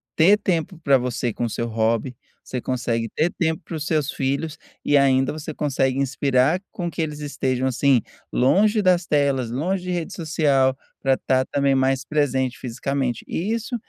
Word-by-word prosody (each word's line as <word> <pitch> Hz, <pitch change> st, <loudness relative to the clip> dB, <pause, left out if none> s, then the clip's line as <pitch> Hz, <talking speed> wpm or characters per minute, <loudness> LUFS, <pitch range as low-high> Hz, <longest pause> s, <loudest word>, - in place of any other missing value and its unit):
ter 195 Hz, +6 st, +6 dB
tempo 180 Hz, -3 st, -1 dB
pra 140 Hz, -3 st, +5 dB
você 120 Hz, -1 st, -2 dB
com 120 Hz, -, -2 dB
o 115 Hz, -, -2 dB
seu 115 Hz, -, -3 dB
hobby, 115 Hz, +2 st, 0 dB, 0.3 s
você 125 Hz, -2 st, -5 dB
consegue 115 Hz, -3 st, -2 dB
ter 165 Hz, +3 st, +1 dB
tempo 160 Hz, -2 st, +1 dB
para 165 Hz, -, -6 dB
os 155 Hz, -, -3 dB
seus 150 Hz, -4 st, 0 dB
filhos, 140 Hz, +3 st, -2 dB, 0.3 s
e 145 Hz, -, +3 dB
ainda 135 Hz, -1 st, +3 dB
você 155 Hz, 0 st, -6 dB
consegue 135 Hz, -3 st, 0 dB
inspirar 140 Hz, +4 st, +1 dB
com 175 Hz, -3 st, -4 dB
que 165 Hz, -, -3 dB
eles 150 Hz, -2 st, -3 dB
estejam, 130 Hz, -3 st, -1 dB
assim, 130 Hz, -1 st, +3 dB, 0.3 s
longe 205 Hz, -, +3 dB
das 180 Hz, -2 st, +3 dB
telas, 140 Hz, -5 st, +1 dB
longe 175 Hz, +10 st, -1 dB
de -, -, -4 dB
rede 175 Hz, -2 st, -3 dB
social, 140 Hz, -5 st, +1 dB, 0.2 s
pra 135 Hz, -1 st, +2 dB
tá 130 Hz, -1 st, +1 dB
também 140 Hz, 0 st, +1 dB
mais 130 Hz, 0 st, +1 dB
presente 130 Hz, -4 st, 0 dB
fisicamente. 125 Hz, 0 st, -3 dB
E 190 Hz, +6 st, -2 dB
isso 230 Hz, +2 st, -3 dB
140 Hz, 175 wpm, -23 LUFS, 130-160 Hz, 0.3 s, ter